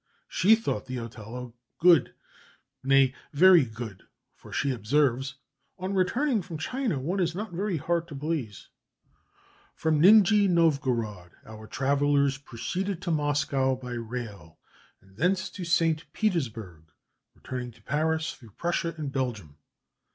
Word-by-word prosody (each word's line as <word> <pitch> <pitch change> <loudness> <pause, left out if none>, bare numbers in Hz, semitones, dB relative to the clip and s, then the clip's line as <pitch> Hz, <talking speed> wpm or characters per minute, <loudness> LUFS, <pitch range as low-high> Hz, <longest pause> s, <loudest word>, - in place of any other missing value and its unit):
She 215 +5 +4
thought 220 - -3
the 130 0 -4
Othello 115 +1 -8 0.2
good, 170 -4 +4 0.7
nay, 135 -1 +4 0.2
very 175 +1 +7
good, 110 -4 -8 0.3
for, - - -16
she 140 - 0
observes, 130 +2 +1 0.4
"On 185 +1 -4
returning 225 +6 +1
from 165 -2 -7
China 245 - -2
one 170 +9 -2
is 170 -2 0
not 210 +2 -5
very 185 +1 -2
hard 170 +2 -1
to 155 - -9
please." 140 -8 -4 1.1
From 155 -2 +1
Nijni 205 +2 +6
Novgorod 125 - 0
our 110 0 -11
travellers 140 +2 +1
proceeded 175 - -4
to 175 - -1
Moscow 145 -3 +1
by 125 -1 -8
rail, 115 -8 -6 0.4
and 95 0 -23
thence 185 +6 +1
to 185 - -7
St. 165 -2 +1
Petersburg, 115 - -2 0.5
returning 125 -1 -6
to - - -22
Paris 160 +2 0
through 115 -6 -17
Prussia 170 -1 -1
and 150 -3 -4
Belgium. 115 - -3
145 Hz, 130 wpm, -27 LUFS, 120-175 Hz, 1.1 s, very